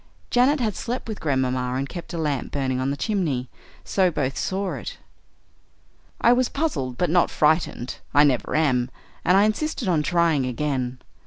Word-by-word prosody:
Janet 260 +5 +4
had 220 -5 0
slept 245 +1 -4
with 220 -2 -5
Grandmamma 130 -3 0
and 135 +1 -1
kept 175 +2 -8
a - - -3
lamp 150 -5 -2
burning 130 -2 -1
on 130 +1 0
the 140 - -2
chimney, 150 - -1 0.3
so 190 -2 +2
both 140 -5 -2
saw 190 0 -2
it. - - -6 1.2
"I 240 - +5
was 250 0 +2
puzzled, 135 - -2
but 175 +1 +1
not 175 0 +4
frightened; 150 -5 +1
I 145 - +6
never 135 -4 +1
am, 130 -6 +2 0.3
and 180 +2 +4
I 200 - +6
insisted 225 +3 -1
on 165 -4 +2
trying 165 -4 +2
again. 130 -1 -2
155 Hz, 170 wpm, -24 LUFS, 130-195 Hz, 1.2 s, I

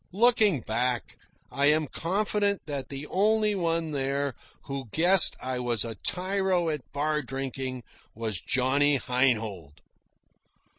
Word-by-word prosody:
Looking 215 - +4
back, 120 +2 -2 0.4
I 140 +1 +1
am 155 +1 +3
confident 200 +6 -1
that 140 -3 -5
the 140 +1 -6
only 210 +4 +1
one 165 -4 -1
there 140 -1 -2 0.3
who 135 -4 -6
guessed 175 - +6
I 130 0 -4
was 120 -3 +1
a 115 - -5
tyro 185 - -1
at 150 -4 -5
bar 150 +1 -1
drinking 130 -1 -5 0.3
was 110 -5 -4
Johnny 140 +3 +2
Heinhold. 110 - -1
140 Hz, 120 wpm, -27 LUFS, 125-180 Hz, 0.4 s, guessed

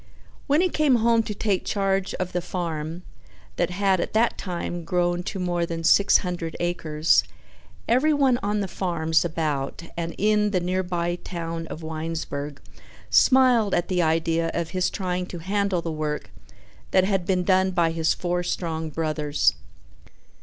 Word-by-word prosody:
When 295 +3 +4
he 370 - +2
came 300 -5 +3
home 230 0 +3
to 215 -2 -5
take 200 -2 0
charge 195 -1 0
of 185 -1 -3
the 180 - -1
farm, 170 -2 -4 0.5
that 175 - +1
had 190 0 +1
at - - -3
that 225 +2 +2
time 175 -1 -4
grown 175 0 0
to - - -4
more 175 -2 -1
than 165 -1 -3
six 200 +4 +5
hundred 175 -2 -4
acres, 165 -3 +2 0.6
everyone 270 0 +3
on 205 +1 0
the 195 - -2
farms 165 -3 0
about 155 -3 -2
and 170 0 -4
in 210 0 +2
the 190 -3 +1
nearby 175 -1 -1
town 165 -2 -5
of 160 - -8
Winesburg 155 -3 -4 0.5
smiled 250 -6 +5
at 175 - -1
the 180 -2 +1
idea 165 0 +1
of 170 -1 -2
his 185 -1 +1
trying 180 -2 -3
to 180 - -7
handle 190 0 -1
the 165 - -3
work 155 -1 -3 0.6
that 185 - +4
had 190 -2 0
been 185 -2 +1
done 190 0 +3
by 170 -3 +1
his 165 -1 +1
four 175 0 -1
strong 160 -2 -3
brothers. 155 -1 +1
175 Hz, 160 wpm, -24 LUFS, 165-195 Hz, 0.6 s, six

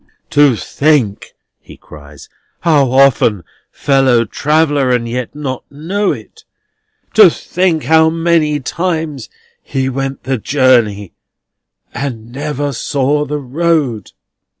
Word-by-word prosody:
"To 145 -4 +4
think," 140 -5 -1 0.2
he - - -15
cries, 75 -1 -14 0.3
"how 150 -6 +3
often 125 -7 +3 0.3
fellow 135 -4 +2
traveller, 145 +2 +1
and 120 -2 0
yet 125 +2 -5
not 135 -4 -5
know 180 +8 -2
it! - - -9 0.7
To 215 -5 +8
think 170 -1 -1
how 160 0 +4
many 165 -2 +1
times 160 -5 -3 0.3
he 130 -1 -2
went 135 +1 -4
the 130 -2 -2
journey, 115 -7 +1 0.8
and 120 -4 -5
never 145 +1 -3
saw 145 +4 -1
the 150 +1 -3
road!" 140 - -1
140 Hz, 110 wpm, -14 LUFS, 125-155 Hz, 0.8 s, To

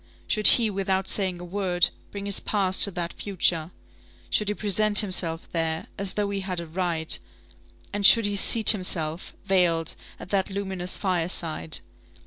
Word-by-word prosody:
Should 215 -1 +3
he, 225 -3 -2
without 190 -1 -3
saying 185 -3 0
a - - -10
word, 180 -1 -1 0.2
bring 200 -1 -9
his 200 -1 -2
past 190 -3 +1
to - - -4
that 175 -2 -6
future? 170 -5 -2 0.6
Should 210 - -1
he 210 - -3
present 210 +1 +5
himself 175 -5 -2
there, 160 -1 -4
as 195 -1 -5
though 205 -1 -3
he 200 - -4
had 185 -2 -6
a 170 - -7
right, 165 -1 -2 0.7
and 205 0 -4
should 230 +2 +6
he 205 0 -3
seat 220 +2 +7
himself, 175 -5 -3
veiled, 170 -4 -1 0.2
at - - -12
that 195 -1 -2
luminous 190 -2 -4
fireside? 170 -4 -2
190 Hz, 160 wpm, -23 LUFS, 170-200 Hz, 0.7 s, seat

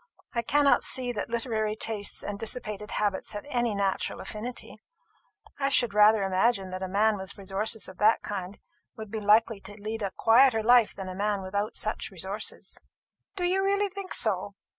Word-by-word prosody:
I 235 - 0
cannot 285 +4 +3
see 255 -1 +1
that 215 -2 -4
literary 225 -2 -1
tastes 215 -2 -2
and 205 -1 -5
dissipated 215 -2 -3
habits 205 -1 0
have 205 - -6
any 240 -6 0
natural 200 -1 -1
affinity. 235 +3 -6 0.8
I 275 0 +1
should 240 -6 +3
rather 210 0 +5
imagine 195 +1 +1
that 185 0 -5
a 190 - -2
man 210 +3 +2
with 190 0 -6
resources 205 +3 -2
of 190 - -12
that 215 +2 +4
kind 195 -1 -5 0.4
would 220 -2 -8
be 220 - -3
likely 215 +1 +3
to 205 +1 -10
lead 215 +2 -5
a 200 - -1
quieter 230 -1 +5
life 240 -1 +5
than 195 -1 -6
a 185 - -5
man 200 0 -1
without 200 +3 -3
such 215 - -2
resources." 195 +3 -4 0.6
"Do 370 - -3
you 370 +2 +1
really 400 +1 +1
think 390 0 -6
so? 200 -2 -1
215 Hz, 180 wpm, -27 LUFS, 200-235 Hz, 0.8 s, rather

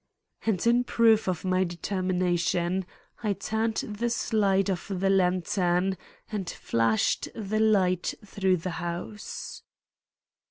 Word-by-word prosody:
And 200 -4 +1
in 240 +1 +4
proof 225 -3 +3
of 185 +1 -2
my 185 0 +2
determination, 180 0 0 0.3
I 210 -3 +1
turned 220 +2 -1
the 215 +3 -2
slide 200 -4 +1
of 185 -4 -2
the 195 0 +1
lantern 180 0 +2 0.4
and 200 -5 -3
flashed 115 -1 +1
the 215 -1 -2
light 190 -5 +2
through 190 -2 +1
the 175 +2 -4
house. 175 +5 -6
190 Hz, 115 wpm, -27 LUFS, 180-210 Hz, 0.4 s, in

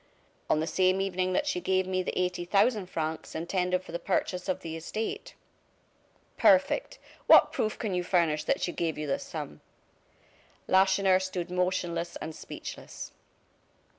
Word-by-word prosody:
"On - - +3
the 160 - 0
same 185 +2 +2
evening 185 -1 0
that - - +1
she 180 - -1
gave 190 0 +1
me 185 0 0
the 185 - -4
eighty 180 -1 -1
thousand 200 +2 +2
francs 160 -2 -4
intended 180 +2 -1
for - - -11
the 170 - -3
purchase 180 0 -1
of 185 - -1
the 165 -1 -5
estate." 215 +7 -5 1.0
"Perfect! 285 - +3 0.3
What - - +8
proof 215 - -1
can 215 -4 -3
you 180 0 0
furnish 165 -4 +1
that - - +1
she 175 - 0
gave 165 -2 -2
you 155 - -3
this 140 - -2
sum?" 75 0 -7 1.1
Lacheneur 190 0 +4
stood 185 -2 -4
motionless 180 -2 -1
and 160 - -6
speechless. - - -8
180 Hz, 155 wpm, -29 LUFS, 170-190 Hz, 1.1 s, What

